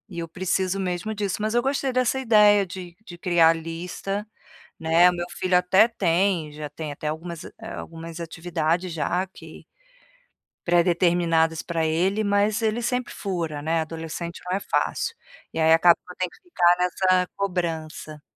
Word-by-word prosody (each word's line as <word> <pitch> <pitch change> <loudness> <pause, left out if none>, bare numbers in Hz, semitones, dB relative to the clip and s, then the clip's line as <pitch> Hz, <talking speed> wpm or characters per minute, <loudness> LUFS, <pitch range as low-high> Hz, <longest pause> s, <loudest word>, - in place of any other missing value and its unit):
E 175 -3 -7
eu 165 - -4
preciso 185 +2 -1
mesmo 185 +3 -2
disso. 200 -3 -2
Mas 215 +1 -1
eu 240 - +3
gostei 270 +1 0
dessa 255 +1 +1
ideia 210 -5 +5
de 180 -1 -9
de 175 -4 -10
criar 170 -2 +4
a - - +5
lista, 170 +5 -5 0.5
né? 165 +2 +5
O - - -5
meu 175 0 -3
filho 185 -1 +1
até 185 +5 +5
tem 175 -6 +1
já 150 0 -6
tem 150 0 -6
até 150 +1 -5
algumas 165 +2 -5 0.2
algumas 165 0 -8
atividades 165 +1 -2
já, 175 +3 -1
que 190 - -13 1.0
predeterminadas 170 -2 +2
pra 165 -2 -1
ele, 185 +7 +1
mas 205 +2 +2
ele 220 +1 0
sempre 250 +1 -1
fura, 170 -7 -3
né. 165 +1 +1
Adolescente 165 +2 -6
não 180 +1 -1
é - - -4
fácil. 465 - -1 0.4
E - - -3
aí 160 0 +5
acaba 170 +1 +6
que - - -15
eu - - -23
tenho 185 -1 -1
que - - -21
ficar 175 - +3
nessa 180 0 +2
cobrança. 160 -5 -3
175 Hz, 165 wpm, -24 LUFS, 165-195 Hz, 1.0 s, acaba